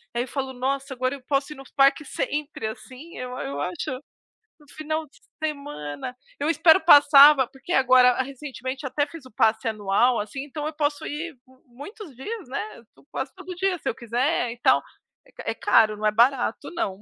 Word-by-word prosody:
aí 240 - +1
eu - - -9
falo: 265 0 -4
"Nossa, 270 +2 -3
agora 255 +2 -1
eu 275 - -13
posso 275 +1 0
ir - - -16
nos 270 -1 -13
parques 275 +1 +3
sempre." 295 -5 -3
Assim, 260 +8 -10
eu 250 - -5
eu 140 - -4
acho, 180 - -3 0.7
no 295 - -21
final 310 +1 -4
de 280 - -24 0.3
semana, 255 - -5 0.2
eu 295 +3 0
espero 325 +2 +5
passar, 290 -2 +8
va 265 -4 0
porque 270 +6 -11
agora, 255 -2 +5
recentemente, 265 0 -6
até 290 +2 -1
fiz 300 -2 -12
o - - -14
passe 220 +2 +1
anual, 215 +4 +1
assim, 220 +6 -5
então 295 +1 -5
eu 310 - -5
posso 290 -1 -1
ir 300 +1 -5 0.3
muitos 290 - -11
dias, 395 - -7
né, 215 -2 -6
tu - - -22
quase 265 +1 -4
todo 370 -1 -9
dia, 375 0 0
se - - -8
eu - - -3
quiser 245 +2 -1
e 235 - -10
tal. - - +4 0.4
É - - -22
ca - - -11
é - - -3
caro, 215 -1 +3
não 215 - -4
é 210 - +3
barato, 240 +1 +1
não, 200 - -3
mas - - -21
270 Hz, 200 wpm, -24 LUFS, 245-300 Hz, 0.7 s, passar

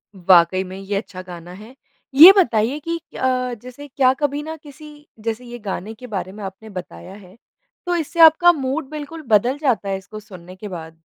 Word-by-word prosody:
वाक़ई 185 0 +4
में 185 +1 -9
ये 195 +1 -5
अच्छा 185 -3 -7
गाना 175 -1 -11
है। 215 +7 -13 0.4
ये 335 +7 +12
बताइए 250 - +2
कि 335 0 -1
अ, 255 -5 -2
जैसे 255 +4 -11
क्या 260 -1 +2
कभी 290 0 -1
न 320 +1 -6
किसी 295 0 -14 0.2
जैसे 230 +2 -4
ये 240 0 -9
गाने 205 +1 -5
के 250 +3 -11
बारे 190 -3 -5
में 205 0 -10
आपने 195 +3 -9
बताया 180 - -9
है 195 +1 -16 0.5
तो 355 0 0
इससे 335 +1 -4
आपका 325 +2 +7
मूड 270 0 -3
बिल्कुल 305 +1 -8
बदल 240 +5 +2
जाता 250 -9 -1
है 195 - -1
इसको 215 +3 -11
सुनने 185 -3 -13
के 210 +2 -9
बाद? 165 -3 -9
225 Hz, 195 wpm, -20 LUFS, 190-290 Hz, 0.5 s, ये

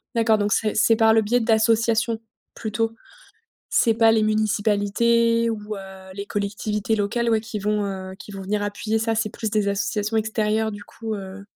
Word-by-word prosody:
D'accord 225 -1 +3
donc 205 0 0
c'est 215 -2 0
c'est 225 +1 +4
par 220 0 +4
le 225 - +5
biais 240 +4 +1
d'associations 225 0 +2 0.3
plutôt? 225 +1 -2 0.8
C'est 230 - +3
pas 225 0 +4
les 220 -1 +3
municipalités 215 +2 +2
ou, 210 -1 -5
heu, 190 -1 -11
les 200 +1 -5
collectivités 205 +1 -2
locales, 220 +4 0
ouais, 225 -1 +3
qui 220 -1 -5
vont, 210 +1 0
heu, 190 -1 -5
qui - - -11
vont 195 - -7
venir 205 +2 -2
appuyer 210 +2 -1
ça, 225 0 0
c'est 220 0 0
plus 220 +1 -4
des 210 -1 +1
associations 210 +2 -1
extérieures 220 0 0
du 205 0 -8
coup, 225 -1 -6
heu 195 0 -8
215 Hz, 180 wpm, -23 LUFS, 205-225 Hz, 0.8 s, le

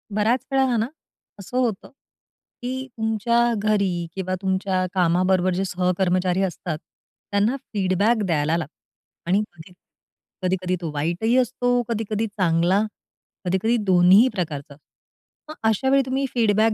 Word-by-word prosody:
बराच 225 +4 +1
वेळा 270 0 +3
आहे 255 -2 +1
ना, 220 - 0 0.5
असं 200 +6 -5
होतं 235 -6 -1 0.7
की 260 +2 -4
तुमच्या 220 +1 +1 0.2
घरी 200 -5 0
किंवा 185 -1 -2
तुमच्या 190 -1 0
कामाबरोबर 185 +1 +2
जे 185 +2 -1
सहकर्मचारी 180 0 +1
असतात 175 -3 -3 0.5
त्यांना 205 +6 +2 0.2
फीडबॅक 205 +3 +2
द्यायला 160 -2 +1
लागतो. 160 -2 -5 0.6
आणि 195 +3 +3 0.2
कधी 160 +3 -13 0.7
कधी-कधी 185 0 0
तो 165 -3 -3
वाईटही 170 +11 0
असतो, 245 -1 +1
कधी-कधी 225 -1 -1
चांगला, 185 -1 +2 0.6
कधी-कधी 190 +6 +1
दोन्हीही 185 +5 +6
प्रकारचा 150 -6 -4
अ, - - -18 0.7
मग - - -8
अशावेळी 265 +5 +3
तुम्ही 265 +1 -1
फीडबॅक 220 -2 +3
195 Hz, 125 wpm, -23 LUFS, 180-225 Hz, 0.7 s, दोन्हीही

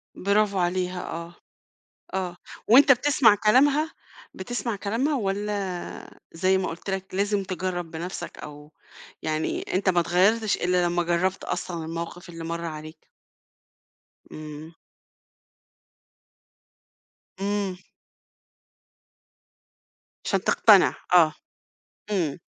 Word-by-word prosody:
برافو 200 0 +1
عليها، 180 0 -1
آه. 170 +1 -6 0.8
آه. 180 -2 -2 0.3
وأنت 265 +4 +8
بتسمع 255 -3 +4
كلامها؟ 275 +9 +3 0.4
بتسمع 235 +3 -3
كلامها 230 +10 -1
والّا 200 -4 -4
زي 185 +3 +2
ما 185 - -2
قُلت 170 +4 -6
لك، 190 -1 -4
لازم 200 +1 +1
تجرّب 185 -2 -4
بنَفسك 170 +4 -6
أو 150 0 -11 0.5
يعني 155 0 -2
أنت 190 +1 +1
ما 175 -2 +4
اتغيّرتش 200 +6 +2
إلّا 180 0 +1
لمّا 175 0 +1
جرّبت 175 +2 0
أصلًا 170 -3 -4
الموقف 170 +2 -6
اللي 165 -1 -8
مَر 170 +1 -4
عليك؟ 155 0 -8 1.2
إمم. 155 +1 -9 2.7
إمم. 200 -1 -1 2.5
عشان - - +1
تقتنع، - - +5 0.2
آه. 160 -3 +6 0.8
إمم. 175 -8 -1
185 Hz, 95 wpm, -25 LUFS, 170-205 Hz, 2.7 s, وأنت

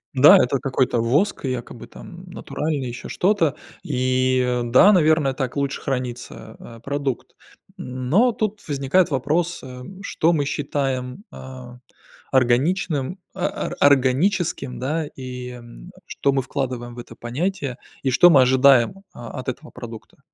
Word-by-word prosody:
Да, 135 +3 +8
это 130 +2 +2
какой-то 130 -3 0
воск, 140 - +1
якобы 125 -2 -5
там 180 -1 -12
натуральный, 155 -6 -4
еще 120 +1 -7
что-то, 175 -6 +1 0.3
и 130 -3 +1
да, 125 - +6
наверное, 155 -6 +3
так 130 -1 -4
лучше 140 -1 -2
хранится, 125 -3 -5
а, 115 0 -12
продукт. 140 +1 -4 0.4
Но 130 - +1
тут 215 -3 -4
возникает 145 +5 +1
вопрос, 155 +6 -1
э: 125 -1 -9 0.2
что 170 -4 +1
мы 145 -3 0
считаем, 135 +2 -3
а, 130 -2 -10 0.5
органичным, 140 +5 +1 0.2
а, 185 - -2
ар 175 - -6
органическим, 140 +1 +2
да, 155 +5 -1
и, 125 -1 -7
м, 120 +8 -12 0.2
что 140 - 0
мы 135 - +1
вкладываем 125 -2 -4
в - - -9
это - - -10
понятие, 140 +2 -3 0.2
и 135 - 0
что 175 +8 +6
мы 140 - +7
ожидаем, 130 +6 +4
а, 120 +1 -8
от 130 - -8
этого 150 +5 -7
продукта? 115 -3 -11
135 Hz, 140 wpm, -22 LUFS, 125-155 Hz, 0.5 s, Да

